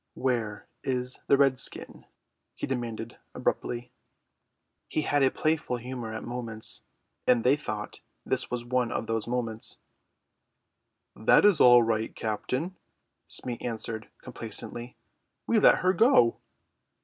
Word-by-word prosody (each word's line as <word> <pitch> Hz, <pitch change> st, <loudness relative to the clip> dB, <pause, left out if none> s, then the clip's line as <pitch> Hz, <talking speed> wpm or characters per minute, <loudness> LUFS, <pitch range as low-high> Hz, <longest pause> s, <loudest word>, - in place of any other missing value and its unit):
"Where 115 Hz, -5 st, -1 dB, 0.2 s
is 125 Hz, -1 st, -1 dB
the 140 Hz, -, +5 dB
redskin?" 135 Hz, -2 st, 0 dB, 0.5 s
he -, -, -3 dB
demanded 115 Hz, -3 st, -4 dB, 0.2 s
abruptly. 120 Hz, 0 st, -2 dB, 1.0 s
He 155 Hz, -, -1 dB
had 145 Hz, -1 st, +2 dB
a 135 Hz, -, +5 dB
playful 155 Hz, -5 st, 0 dB
humour 120 Hz, -2 st, -6 dB
at -, -, -5 dB
moments, 115 Hz, -3 st, -4 dB, 0.5 s
and 120 Hz, -2 st, +4 dB
they 130 Hz, +3 st, +5 dB
thought 105 Hz, -7 st, -5 dB, 0.2 s
this -, -, -1 dB
was 120 Hz, -1 st, -3 dB
one 125 Hz, -1 st, 0 dB
of -, -, -2 dB
the 115 Hz, -1 st, -1 dB
moments. 115 Hz, -2 st, -2 dB, 1.4 s
"That 110 Hz, -, +5 dB
is 205 Hz, -5 st, +5 dB
all 120 Hz, -1 st, +8 dB
right, 110 Hz, -1 st, -1 dB
captain," 130 Hz, -, -2 dB, 0.5 s
Smee 120 Hz, -2 st, -5 dB
answered 110 Hz, -1 st, -4 dB
complacently; 120 Hz, +1 st, -4 dB, 0.5 s
"we 230 Hz, -, +3 dB
let -, -, +6 dB
her 185 Hz, -, +5 dB
go." 190 Hz, -, +5 dB
120 Hz, 125 wpm, -28 LUFS, 115-130 Hz, 1.4 s, all